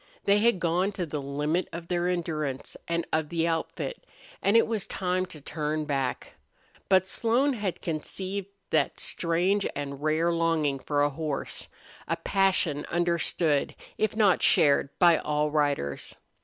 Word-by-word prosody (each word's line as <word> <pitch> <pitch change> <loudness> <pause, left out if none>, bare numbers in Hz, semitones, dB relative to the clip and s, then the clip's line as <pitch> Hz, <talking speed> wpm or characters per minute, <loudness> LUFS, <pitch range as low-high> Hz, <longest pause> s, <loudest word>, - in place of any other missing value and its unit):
They 200 +1 +4
had 230 -3 +3
gone 175 +4 +1
to 185 -3 -2
the 150 -2 -4
limit 150 +5 -1
of 170 0 -7
their 175 0 0
endurance 155 -6 -2
and 170 0 -1
of 155 -1 +1
the 165 -1 0
outfit, 165 - -3 0.4
and 200 +3 +4
it 230 - +5
was 225 -3 -2
time 185 0 -1
to 155 - -10
turn 150 +1 -3
back. 135 -3 -2 0.6
But 190 -1 +4
Slone 240 +8 +2
had 205 -6 -3
conceived 185 +5 -4 0.2
that - - +1
strange 180 +4 +1
and 140 -1 -5
rare 155 +3 +2
longing 165 -4 +1
for 145 +1 0
a 145 - +2
horse 150 -1 -4 0.4
a - - +1
passion 190 -7 +1
understood, 170 -3 +1 0.2
if 215 0 +1
not 205 -4 +4
shared, 140 -1 +4
by 170 -3 +6
all 150 0 0
riders. 145 - -1
165 Hz, 150 wpm, -27 LUFS, 150-185 Hz, 0.6 s, by